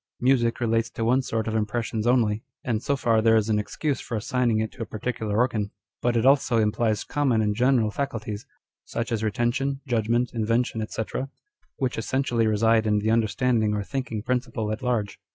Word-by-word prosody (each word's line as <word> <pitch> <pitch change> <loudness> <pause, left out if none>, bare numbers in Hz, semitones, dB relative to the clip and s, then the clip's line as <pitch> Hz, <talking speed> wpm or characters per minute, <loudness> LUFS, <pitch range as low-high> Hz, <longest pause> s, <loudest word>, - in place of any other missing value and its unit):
Music 120 -2 +2
relates 115 -1 +1
to 115 - -3
one 125 +3 +3
sort 115 -3 -2
of 110 - -1
impressions 110 +1 -1
only, 115 -4 +2 0.2
and 110 -3 -1
so 140 - 0
far 115 -4 +2
there 115 0 +5
is 110 0 +2
an 105 -1 +2
excuse 140 +5 -2
for 115 - -4
assign 125 +3 0
ing 110 -1 +2
it 110 0 -2
to 130 - -11
a - - -1
particular 110 -1 -3
organ; 115 -4 +1 0.3
but 120 -1 +1
it 115 - +1
also 135 -3 +4
implies 110 0 +1
common 135 -6 +1
and 105 -1 +1
general 120 -2 +3
faculties, 110 -5 -4 0.4
such 115 +1 -4
as 110 -2 -1
retention, 120 +6 0
judgment, 120 0 +1
inven 115 +2 +1
tion, 110 -2 -4
&c., 110 - -3 0.7
which 130 -4 -2
essentially 120 -1 0
reside 110 +1 +3
in 105 0 +3
the 110 +2 +1
understanding 115 -1 +2
or 105 - -1
thinking 115 -3 -4
principle 120 -3 -1
at 110 - -4
large. 120 -5 -1
115 Hz, 190 wpm, -25 LUFS, 110-125 Hz, 0.7 s, there